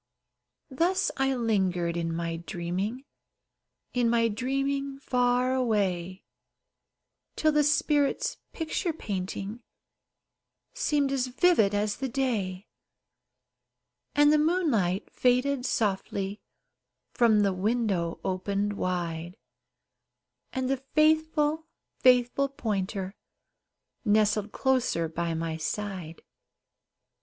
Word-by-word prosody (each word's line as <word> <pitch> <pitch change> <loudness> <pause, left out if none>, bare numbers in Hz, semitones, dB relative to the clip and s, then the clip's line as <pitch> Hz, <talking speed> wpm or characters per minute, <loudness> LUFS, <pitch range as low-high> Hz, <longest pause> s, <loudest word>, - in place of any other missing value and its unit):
Thus 360 +8 +1
I 270 0 +1
lingered 190 -7 0
in 165 -1 -1
my 165 0 -2
dreaming, 180 +9 -4 0.9
In 245 -2 +2
my 230 0 +3
dreaming 275 +4 -2
far 250 -1 +1
away, 195 -7 0 1.1
Till 310 - +3
the 300 0 +3
spirit's 295 -1 +1
picture 325 +1 -2
painting 200 - -5 1.1
Seemed 295 - +1
as 260 -2 0
vivid 250 - +3
as 205 0 0
the 265 0 -3
day; 215 -8 -2 1.5
And 295 +1 +6
the 305 - +4
moonlight 280 - +1
faded 255 +1 +2
softly 200 -1 -1 0.7
From 220 -3 +4
the 200 -2 +2
window 195 -4 0
opened 200 +2 -1
wide, 175 -2 -3 1.2
And 260 -1 -2
the 270 +1 +1
faithful, 310 +2 +1 0.3
faithful 250 +2 +4
pointer 195 -6 -3 0.9
Nestled 210 -1 +2
closer 255 -11 +1
by 165 +1 -2
my 160 0 -3
side. 180 -1 -5
230 Hz, 95 wpm, -28 LUFS, 190-270 Hz, 1.5 s, And